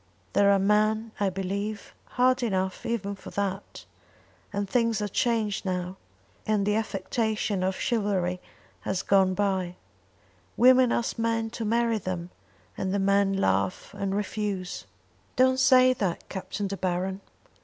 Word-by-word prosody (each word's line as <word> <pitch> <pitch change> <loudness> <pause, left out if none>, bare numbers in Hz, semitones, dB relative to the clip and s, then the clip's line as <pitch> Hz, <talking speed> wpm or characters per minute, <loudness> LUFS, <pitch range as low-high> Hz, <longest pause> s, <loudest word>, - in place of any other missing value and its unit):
There 200 0 +4
are 200 - +5
men, 215 +3 +2
I 200 -1 +2
believe, 200 +3 -4 0.2
hard 255 +1 +4
enough 190 -5 -1
even 205 -4 -2
for 195 - -10
that; 200 -1 -4 0.7
and 200 0 -2
things 230 0 +1
are 210 - -1
changed 220 -1 0
now, 180 -1 -3 0.5
and 210 -2 +1
the 210 - +2
affectation 215 -1 -1
of 190 +1 0
chivalry 195 -7 -1 0.4
has 190 - -2
gone 190 -1 +3
bye. 190 -3 -1 0.8
Women 255 0 +6
ask 235 0 -1
men 225 0 0
to 230 -1 -4
marry 230 0 +1
them, 180 -2 -5 0.4
and 190 - -2
the 200 - +1
men 200 0 +2
laugh 95 - 0
and 195 -1 -2
refuse." 200 - -3 0.5
"Don't 260 0 +4
say 255 -1 +6
that, 195 -8 -3
Captain 200 +2 -4
De 195 0 -3
Baron." 185 +1 -2
200 Hz, 140 wpm, -27 LUFS, 190-225 Hz, 0.8 s, Women